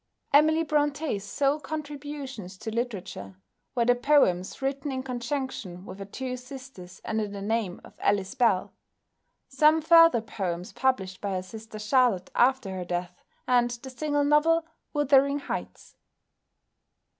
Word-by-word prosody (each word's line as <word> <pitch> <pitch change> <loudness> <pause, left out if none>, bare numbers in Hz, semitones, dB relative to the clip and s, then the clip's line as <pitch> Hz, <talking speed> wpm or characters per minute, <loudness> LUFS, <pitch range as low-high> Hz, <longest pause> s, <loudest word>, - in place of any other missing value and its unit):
Emily 315 +3 +5
Brontë's 295 -7 0
sole 280 +7 0
contributions 290 -10 -6
to 220 +3 -6
literature 200 - -4 0.4
were 235 -2 +2
the 245 - +5
poems 245 -9 +2
written 275 +1 -2
in 260 -1 -3
conjunction 245 -7 -4
with 190 0 -9
her 195 - -5
two 255 +5 -5
sisters 250 -8 -11
under 220 -1 -1
the 200 0 -7
name 205 -2 -1
of - - -14
Ellis 200 0 +1
Bell, 235 -8 +2 0.7
some 305 +4 +4
further 330 -5 +6
poems 185 -5 -4
published 240 -7 0
by 200 -1 -2
her 185 -1 -2
sister 220 +3 -10
Charlotte 215 -4 +2
after 260 -5 +2
her 185 -1 -4
death, 175 0 -3 0.3
and 245 -1 +4
the 240 +2 -7
single 290 +2 0
novel 315 +3 +3 0.3
"Wuthering 280 -1 +3
Heights." 285 - -6
250 Hz, 135 wpm, -27 LUFS, 200-285 Hz, 0.7 s, further